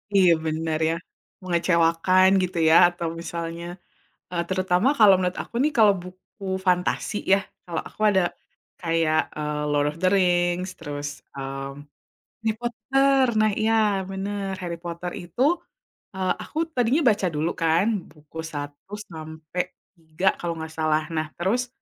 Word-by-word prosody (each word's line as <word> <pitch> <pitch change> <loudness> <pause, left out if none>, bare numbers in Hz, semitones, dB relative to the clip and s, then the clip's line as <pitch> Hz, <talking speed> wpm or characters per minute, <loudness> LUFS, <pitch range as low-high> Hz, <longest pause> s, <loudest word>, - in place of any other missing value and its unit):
Iya 185 -3 +6
benar 160 0 -1
ya, 165 - 0 0.5
mengecewakan 170 +1 +3 0.2
gitu 180 -1 -3
ya 160 - +6 0.2
atau 170 -1 -3
misalnya, 170 0 -5 0.7
eee, 175 -1 -1
terutama 185 +3 +2
kalau 210 -3 +8
menurut 180 -1 0
aku - - -17
nih 300 +1 +2
kalau 210 -3 +7
buku 185 +3 -13 0.2
fantasi 180 +3 +1 0.2
ya - - +3 0.3
kalau 170 -2 -3
aku - - -22
ada, 190 -2 +3 0.6
kayak, 165 -2 +2
eee, 150 0 -3
Lord 145 0 +2
of 150 - -12
the - - +4
Rings 180 -1 +2
terus, 145 0 -5 0.3
mmm, 135 +1 -6 0.6
Harry 220 - +1
Potter 270 +3 +2
nah 215 -1 +4
iya 220 +1 +2 0.4
bener 195 0 -3
Harry 170 -1 -3
Potter 170 +1 -5
itu, 175 +8 -6 0.7
eee, 185 -1 +1
aku - - -10 0.2
tadinya 250 +6 +2
baca 200 -3 +1
dulu 155 +3 0
kan 165 +3 +3 0.3
buku 150 +1 -15 0.2
1 145 +6 -7 0.2
sampai 160 +2 -5 0.3
3 165 +2 -4
kalau 170 -1 -2
gak 160 - -7
salah 155 0 +2
nah 155 -1 -1
terus, 230 +8 0
175 Hz, 145 wpm, -24 LUFS, 160-195 Hz, 0.7 s, kalau